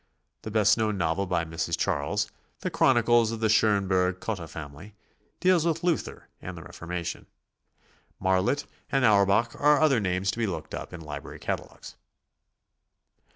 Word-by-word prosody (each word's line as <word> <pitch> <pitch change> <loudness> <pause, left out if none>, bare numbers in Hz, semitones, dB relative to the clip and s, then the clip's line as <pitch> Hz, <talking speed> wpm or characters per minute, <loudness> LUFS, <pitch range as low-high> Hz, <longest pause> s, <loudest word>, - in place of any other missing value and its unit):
The - - -6
best 110 0 +3
known 110 -2 0
novel 85 +3 0
by 85 -2 0
Mrs. 80 0 -2
Charles, 105 +9 0 0.3
"The - - -2
Chronicles 120 -1 +4
of 115 - -4
the 110 -1 +1
Schonberg 95 -4 +2
Cotta 95 -7 -4
Family," 80 +7 -10 0.4
deals 185 -3 +4
with 165 0 -1
Luther 175 -3 -1
and 90 -1 -7
the 85 - -9
Reformation. 85 0 -6 0.9
Marlitt 95 +9 +1 0.3
and 135 -2 +3
Auerbach 105 +2 +4
are 150 0 +5
other 150 -6 +4
names 95 -1 0
to 115 - -7
be 115 - +1
looked 95 - -5
up - - -6
in 85 - -8
library 75 -2 -8
catalogues. - - -6
100 Hz, 150 wpm, -27 LUFS, 90-115 Hz, 0.9 s, are